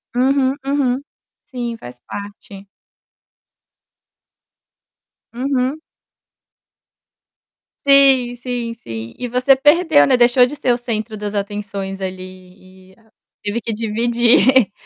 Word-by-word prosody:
Uhum, 265 +1 +2
uhum. 275 -2 0 0.4
Sim, 245 -4 -5
faz 125 - -12
parte. 200 -1 -10 2.7
Uhum. 260 +3 -1 2.1
Sim, 270 -3 +4
sim, 245 -1 -4
sim. 115 - -9
E 245 - -3
você 255 +3 +3
perdeu, 300 +2 +4
né, 265 - +4
deixou 245 +1 +5
de 265 +4 -6
ser 260 -3 0
o 240 - +1
centro 220 -2 -4
das 210 0 -5
atenções 200 -1 -5
ali 185 0 -10
e - - -24 0.5
teve 210 +3 -2
que 225 - -4
dividir 235 +2 +3
240 Hz, 100 wpm, -18 LUFS, 200-260 Hz, 2.7 s, deixou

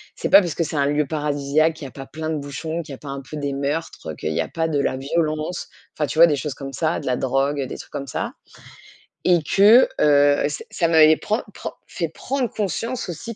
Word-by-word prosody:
C'est - - -3
pas - - +9
parce 175 -5 -3
que 170 - 0
c'est 155 - -5
un 140 -1 +2
lieu 150 0 +1
paradisiaque 150 +1 +1
qu'il 155 -3 -9
y - - -5
a - - -18
pas 135 +2 -9
plein 155 +1 -5
de 155 - -1
bouchons, 155 +4 -4
qu'il 145 - -12
y - - -5
a - - -14
pas 145 - -9
un 135 0 -5
peu 150 +3 -8
des 140 -1 -2
meurtres, 145 - -3
heu, - - -8
qu'il 75 +2 -3
y - - +1
a - - -3
pas 160 -1 -1
de 150 -3 0
la 130 -1 0
violence. 155 +3 -2 0.3
Enfin, 150 -2 -1
tu 155 - -5
vois 170 - +11
des 150 - +1
choses 140 -1 -4
comme 135 -1 -7
ça, 160 +4 0
de - - -9
la 125 - +2
drogue, 135 +2 0
des - - -7
trucs - - -12
comme 140 - -5
ça - - -3 0.9
et 175 -1 +5
que, 210 - +6
heu, 145 0 +4
ça 145 - -5
ça 170 - +1
m'avait 160 -1 +7
prend 215 +3 -1
prend - - -6
fait 165 -4 -3
prendre 255 - -2
conscience 220 - -3
aussi 220 +7 -6
150 Hz, 255 wpm, -22 LUFS, 140-165 Hz, 0.9 s, vois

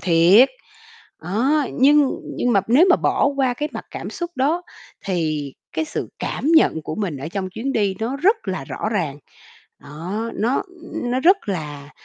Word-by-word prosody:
thiệt. 180 +8 +6 0.7
Đó, 255 - +1
nhưng 285 +1 +4 0.3
nhưng 245 - +1
mà 200 - +4
nếu 275 +10 +6
mà - - +6
bỏ - - +1
qua 260 -3 +1
cái 295 +4 -3
mặt - - -7
cảm - - -6
xúc 345 -1 -5
đó 300 +7 +1 0.4
thì 155 -7 -2 0.2
cái 320 - -1
sự - - -5
cảm - - -4
nhận 315 - +4
của 155 - -5
mình 190 -7 -3
ở 140 +4 -6
trong 190 0 -4
chuyến 245 +8 -3
đi 205 -6 +1
nó 240 +5 -2
rất 385 +10 +3
là 185 - -3
rõ - - -4
ràng. 155 -8 -2 0.6
Đó, 185 +10 -5
nó 235 +6 0 0.4
nó 245 +2 0
rất 370 +6 +6
là 150 -6 -5
220 Hz, 175 wpm, -21 LUFS, 170-275 Hz, 0.7 s, thiệt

